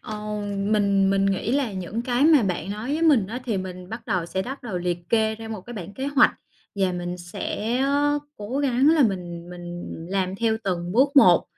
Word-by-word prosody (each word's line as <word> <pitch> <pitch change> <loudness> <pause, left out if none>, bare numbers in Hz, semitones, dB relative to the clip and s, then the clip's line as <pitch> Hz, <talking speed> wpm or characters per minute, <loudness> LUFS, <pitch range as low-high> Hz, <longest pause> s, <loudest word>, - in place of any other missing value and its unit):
ờ, 215 -1 -6 0.4
mình 200 -1 +2
mình 195 0 +2
nghĩ 195 +4 0
là 270 -6 0
những 190 +5 -4
cái 245 +3 +1
mà 310 -5 +6
bạn 185 -2 -2
nói 215 +6 -4
với 315 +2 -1
mình 280 -12 +4
á 235 +5 -5
thì 230 -5 -1
mình 185 -1 -6
bắt 225 +3 -7
đầu 175 -2 0
sẽ 190 +2 -2
bắt 265 +5 -7
đầu 210 -7 -3
liệt 175 0 -1
kê 220 -1 +2
ra 225 0 -9
một 215 -3 -5
cái 240 +5 -10
bảng 195 -1 -7
kế 265 - -4
hoạch 285 0 +5 0.4
và 190 -2 +1
mình 175 0 -4
sẽ, 205 +6 -3
ơ, 285 +2 +2 0.2
cố 215 +7 -4
gắng 270 0 +3
là 320 -2 +5
mình 175 -5 -2
mình 175 0 -7 0.3
làm 190 -1 -1
theo 225 0 +1
từng 175 -2 -2
bước 275 +6 +3
một, 280 - +7
210 Hz, 220 wpm, -24 LUFS, 185-250 Hz, 0.4 s, một